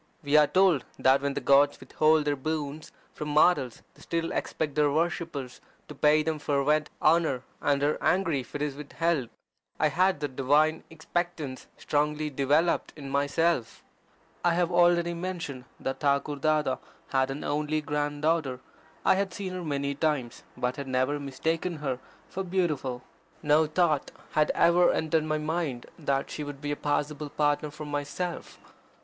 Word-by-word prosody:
We 145 +1 +1
are 150 -1 +7
told 185 -6 +3
that 135 +1 +4
when 140 0 -1
the - - 0
gods 140 +2 +4
withhold 155 +3 +2
their 145 -1 +1
boons 150 +1 -4 0.2
from 150 - -5
mortals 150 -5 +3
they - - -20
still 165 0 -2
expect 150 -3 -2
their 150 0 +3
worshippers 160 -4 -2 0.3
to - - -8
pay 150 +2 +4
them 160 -1 -2
fervent 150 +1 +1
honour, 155 -5 +3 0.2
and 140 -1 +1
are 150 +1 +1
angry 175 -6 +2
if 125 +1 -9
it 145 - -1
is 150 -2 -2
withheld. 150 -2 -1 0.5
I 155 - +3
had 185 +2 +2
that 145 -3 -3
divine 150 +4 +2
expectance 160 -3 -4
strongly 150 +1 -1
developed 145 +5 +1
in 140 -3 -8
myself. 140 -2 0 0.6
I 175 -1 +3
have 175 0 +1
already 175 0 +4
mentioned 170 -7 -5
that 135 - -3
Thakur 145 0 +1
Dada 150 -2 +1 0.3
had 130 0 +1
an 135 +2 -5
only 150 +1 0
grand 145 0 -2
daughter. 155 -6 +1 0.5
I - - +6
had 195 0 0
seen 190 0 -5
her 180 -1 -5
many 140 -2 -1
times, 140 -5 -1 0.2
but 125 0 -1
had 140 -1 -5
never 130 +3 0
mistaken 160 +5 -2
her 135 -5 -3 0.3
for 190 - -4
beautiful. 155 -9 -1 0.4
No 150 +1 +4
thought 155 -2 +1 0.2
had 155 0 +2
ever 175 +1 +5
entered 160 0 +1
my 155 0 0
mind 155 -5 -2
that 140 -3 -1
she 150 - -4
would 145 -1 -7
be 145 0 -3
a - - 0
possible 145 0 -2
partner 145 +1 0
for 150 +1 -8
myself. 145 +5 -4
150 Hz, 165 wpm, -28 LUFS, 140-165 Hz, 0.6 s, are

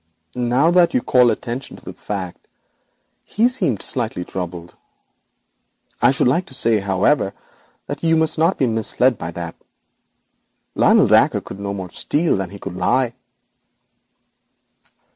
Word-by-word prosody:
'Now 125 +6 +2
that 175 +5 +4
you 255 - +3
call 125 -2 +4
attention 120 +3 -4
to - - -18
the - - -7
fact, 95 -4 -6 0.8
he 225 +3 +1
seemed 240 - -1
slightly 110 -8 -2
troubled. 90 -2 -6 1.3
I - - +6
should 135 -1 +2
like 170 +8 +1
to 130 - -7
say, 115 -3 +2
however, 100 +4 +1 0.5
that 145 - -6
you 165 -1 +2
must 160 -1 +1
not 165 +4 +2
be 135 - +2
misled 115 +2 +1
by 80 - -5
that. 85 0 -6 1.2
Lionel - - +4
Dacre - - +4
could 95 - -10
no 100 0 -4
more 95 -2 -7
steal 155 - 0
than 95 -2 -3
he 100 - -10
could 90 - -7
lie.' 120 +6 +1
120 Hz, 145 wpm, -20 LUFS, 95-145 Hz, 1.3 s, I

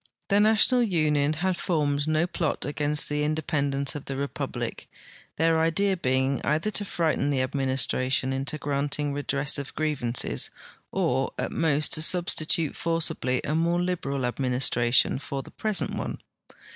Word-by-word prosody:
The 200 0 +4
National 220 +4 +5
Union 155 -8 +2
had 180 +4 -1
formed 145 -3 0
no 155 +1 +2
plot 170 -3 -2
against 150 +1 0
the 150 0 -1
independ 150 -2 -1
ence 140 +1 0
of 145 -3 -7
the 135 - -4
republic, 140 0 -4 0.5
their 165 0 +2
idea 190 +5 +2
lieing 130 -3 0
either 155 +8 0
to 205 - -2
frighten 160 -6 0
the 135 -2 +1
ad 130 - -4
ministration 130 -1 0
into 135 +3 -2
granting 145 0 -1
redress 145 0 -1
of 140 - -7
grievances 140 -6 0 0.4
or - - 0
at - - -2
most 155 -2 +2
to 155 - +2
substitute 165 -2 +2
forcibly 160 -6 -1
a 150 - -2
more 170 +2 +1
liberal 150 -7 -2
administration 125 -1 +2
for 140 -1 -5
the - - -13
present 215 -3 0
one. - - -4
150 Hz, 150 wpm, -26 LUFS, 140-165 Hz, 0.5 s, National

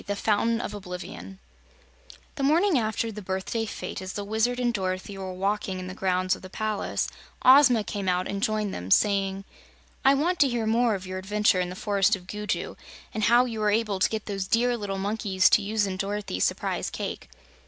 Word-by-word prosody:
23. 205 0 -3
The - - -8
Fountain 225 +2 +1
of - - -5
Oblivion 190 0 -8 1.0
The 290 - -6
morning 320 +3 +3
after 220 0 -1
the 210 0 -7
birthday 190 +4 -3
fete, - - -6
as 185 0 -6
the 205 - -4
Wizard 220 +4 0
and 240 -1 +1
Dorothy 185 -1 -3
were 190 -1 -5
walking 195 +1 -2
in 185 - -6
the 185 - -6
grounds 185 -1 0
of - - -14
the 185 - -10
palace, 215 +1 -2 0.4
Ozma 255 -4 +7
came 200 -2 -3
out 180 0 0
and 200 0 -3
joined 215 -1 0
them, 90 +1 -6
saying: 195 - +2 0.6
"I 270 +1 +6
want 340 +6 0
to 280 - +5
hear 235 -2 -1
more 230 0 +2
of 190 -1 -7
your 185 0 -5
adventures 205 -1 +2
in 180 - -2
the 180 - -7
Forest 205 +1 +2
of 180 -2 -12
Gugu, 210 +2 -4 0.4
and 215 -1 0
how 240 +2 +5
you 230 -3 -5
were 210 -1 +2
able 210 -2 0
to - - +3
get 220 -1 -4
those 195 -2 -3
dear 240 +3 +2
little 205 -4 -4
monkeys 200 -1 +2
to - - +5
use 210 +1 0
in 190 -1 -3
Dorothy's 200 - -1
Surprise - - -1
Cake." - - -5
205 Hz, 205 wpm, -26 LUFS, 190-225 Hz, 1.0 s, Ozma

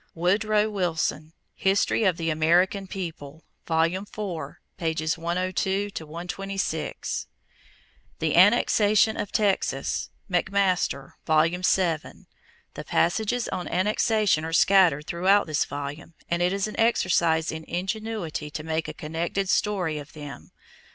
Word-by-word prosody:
Woodrow 210 +5 +2
Wilson, 165 -5 -1 0.2
History 195 +3 +1
of 180 -4 +2
the 165 -1 -1
American 180 +5 +2
People, 160 -5 -7 0.2
Vol. 160 -1 +3
IV, 185 +5 -2
pp. 160 -3 -4
102 185 +4 -1
126. 180 +5 -4 0.9
=The - - 0
Annexation 215 +1 +4
of 205 -2 -4
Texas.= 205 -3 0 0.2
McMaster, 180 -6 0 0.2
Vol. 155 0 +5
VII. 180 -2 -1 0.5
The - - -7
passages 220 +7 +1
on 180 - -4
annexation 210 -2 +2
are 160 - -4
scattered 170 -5 +4
through 170 +3 -3 0.2
this 155 -2 0
volume 145 +3 -7
and 170 0 -1
it 175 +1 +2
is 195 0 0
an 215 - -6
exercise 170 -8 +2
in 160 0 -6
ingenuity 195 -4 -4
to 155 +1 -6
make 160 0 -2
a 155 - -6
connected 170 +6 -3
story 180 -9 0
of 145 0 -11
them. 145 -2 -9
175 Hz, 120 wpm, -25 LUFS, 160-195 Hz, 0.9 s, Vol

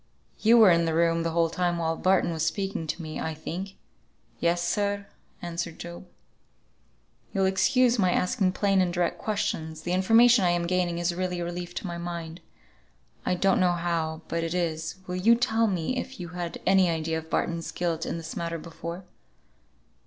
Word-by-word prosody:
"You 230 +2 +5
were 215 -5 +8
in 170 0 +3
the 160 -1 0
room 165 0 +2
the 165 - -1
whole 165 0 +1
time 175 0 0
while 165 -1 0
Barton 185 -1 +2
was 160 -1 -2
speaking 190 0 -2
to 170 - -3
me, 155 -1 -5
I 160 -1 -3
think?" 185 +5 -6 0.6
"Yes, 175 0 +1
sir," 200 +1 -1 0.4
answered 170 -1 -4
Job. 175 +2 -9 1.2
"You'll 195 -2 +1
excuse 245 +5 +3
my 185 -2 +3
asking 185 +1 +1
plain 195 -1 +2
and 180 -1 +1
direct 175 -1 -1
questions; 160 -7 -3
the 175 - -3
information 225 +4 +5
I 180 - +3
am 175 0 +1
gaining 175 -1 0
is 175 0 0
really 180 0 -2
a 170 - -2
relief 175 0 -6
to - - -4
my 170 -1 -4
mind, 170 -1 -6 0.9
I - - +2
don't 195 +5 +2
know 180 -2 +3
how, 165 -2 -2
but 165 0 -2
it 165 +1 -2
is, 160 -2 -2
will 180 0 -4
you 225 +6 +5
tell 230 -2 +2
me 185 +4 -1
if 260 +1 -5
you 175 - -6
had 175 -1 -5
any 190 -2 +4
idea 160 0 -1
of 160 0 -13
Barton's 170 0 -1
guilt 165 -2 -2
in - - -3
this 160 -1 -7
matter 170 0 -3
before?" 170 +2 -7
175 Hz, 190 wpm, -27 LUFS, 165-190 Hz, 1.2 s, were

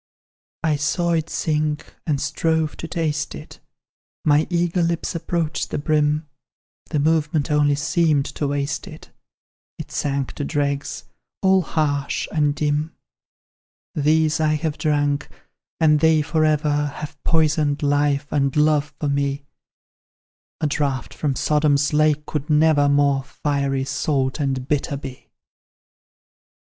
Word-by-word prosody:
"I 155 -2 +2
saw 170 +4 0
it 165 -1 0
sink, 150 -1 -1
and 145 -3 +1
strove 155 +2 0
to 165 - -6
taste 155 -3 -2
it, - - -11 0.7
My 150 +1 +4
eager 175 0 +1
lips 170 +1 -1
approached 165 -2 -2
the - - -2
brim; 150 +1 +1 0.6
The 155 - -2
movement 150 0 +1
only 145 -1 +3
seemed 150 -1 +1
to 145 - -3
waste 140 +1 -2
it; - - -12 0.7
It - - -8
sank 140 -2 -2
to 145 - -4
dregs, 140 -1 -2 0.4
all 190 0 +5
harsh 145 -4 -1
and 150 -2 +1
dim. 150 +2 -1 1.0
"These 155 +1 +2
I 155 -1 +2
have 155 -1 -3
drunk, 145 -2 0 0.5
and 150 -2 +4
they 160 -1 +4
for 155 +1 +1
ever 150 -1 +1
Have 150 - -8
poisoned 155 -2 +1
life 145 0 +2
and 140 -2 +1
love 150 0 +2
for 150 - -1
me; 140 0 -1 1.1
A 160 - -1
draught 140 -5 -1
from 135 +3 -1
Sodom's 150 -1 +2
lake 150 0 +2
could 150 0 -4
never 150 -1 +4
More 140 -1 +3
fiery, 140 -1 -1
salt, 135 0 -1
and 135 -3 -1
bitter, 145 -1 -1
be. 135 -2 -9
150 Hz, 130 wpm, -22 LUFS, 145-155 Hz, 1.1 s, all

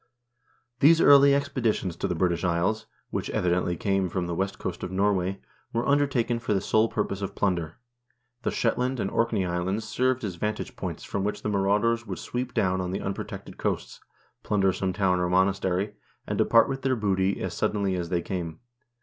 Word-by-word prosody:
1 - - -40 0.7
These 160 +4 +6
early 140 -2 +7
expeditions 125 -10 -1
to - - -1
the 90 - -1
British 85 0 0
Isles, 95 +6 0 0.2
which, - - -3
evidently, 90 -1 0
came 95 -2 0
from 90 +1 -2
the 85 - -3
west 95 +3 -2
coast 90 -2 -5
of - - -4
Norway, 95 0 0 0.3
were 115 +1 0
undertaken 135 -5 +2
for 110 -3 -1
the - - +2
sole 110 +3 +2
purpose 100 -2 -2
of 100 - -4
plunder. 85 -5 -1 0.6
The - - -1
Shetland 125 +2 0
and 95 - -1
Orkney 115 -5 +1
Islands 90 +5 -2
served 130 +2 0
as 95 -5 -4
vantage 105 +3 -3
points - - -5
from 100 - -3
which 105 - -3
the - - -1
marauders 105 +4 +1
would - - -4
sweep 125 0 -4
down 95 -1 +1
on 90 - -3
the 95 - -2
unprotected 95 0 -6
coasts, - - -2 0.4
plunder 95 -2 +2
some 95 0 -1
town 95 -2 +1
or 90 0 0
monastery, 95 +1 +1 0.3
and - - -2
depart 115 - +5
with 135 0 -3
their 130 0 +1
booty 100 -3 0
as - - -3
suddenly 100 -2 0
as 90 -2 -3
they 85 -1 0
came. 85 -4 -4
100 Hz, 190 wpm, -26 LUFS, 90-115 Hz, 0.7 s, early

